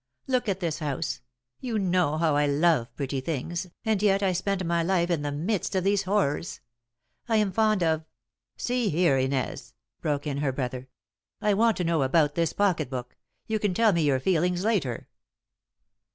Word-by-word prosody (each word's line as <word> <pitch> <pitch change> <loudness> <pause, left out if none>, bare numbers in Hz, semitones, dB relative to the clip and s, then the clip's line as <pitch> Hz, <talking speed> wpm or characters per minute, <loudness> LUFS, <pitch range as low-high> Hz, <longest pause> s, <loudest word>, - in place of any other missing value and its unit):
Look 255 -4 0
at 195 0 -2
this 165 -3 -2
house. 135 - -3 0.4
You 235 -4 -2
know 180 -6 +1
how 160 -2 +2
I 145 0 +3
love 145 -3 +2
pretty 135 -1 -3
things, 165 +5 -3 0.2
and 220 -3 +1
yet 200 -1 +3
I 190 - +3
spend 185 +1 -1
my 170 0 +1
life 175 0 +1
in 165 -4 +1
the 145 0 -2
midst 180 +7 -2
of 185 - +1
these 200 0 +2
horrors. 185 -5 0 0.7
I 225 - +2
am 210 -3 +2
fond 215 -3 +2
of 160 -1 +1 0.3
" - - -57
"See 245 -3 +1
here, 160 -5 +3
Inez," 130 -3 -2 0.3
broke 145 -2 -1
in 140 -2 -2
her 140 -1 0
brother, 130 -1 -4 0.5
"I 210 -1 +2
want 225 +2 +3
I - - -10
to 180 - -1
know 165 -2 +1
about 145 +2 +3
this 165 -1 0
pocket 180 -9 +1
book. 125 -2 -6 0.3
You 220 -1 -1
can 205 -3 0
tell 225 -1 +4
me 170 - +1
your 140 -4 +2
feelings 180 +3 +1
later." 185 - -1
170 Hz, 190 wpm, -27 LUFS, 145-195 Hz, 0.7 s, tell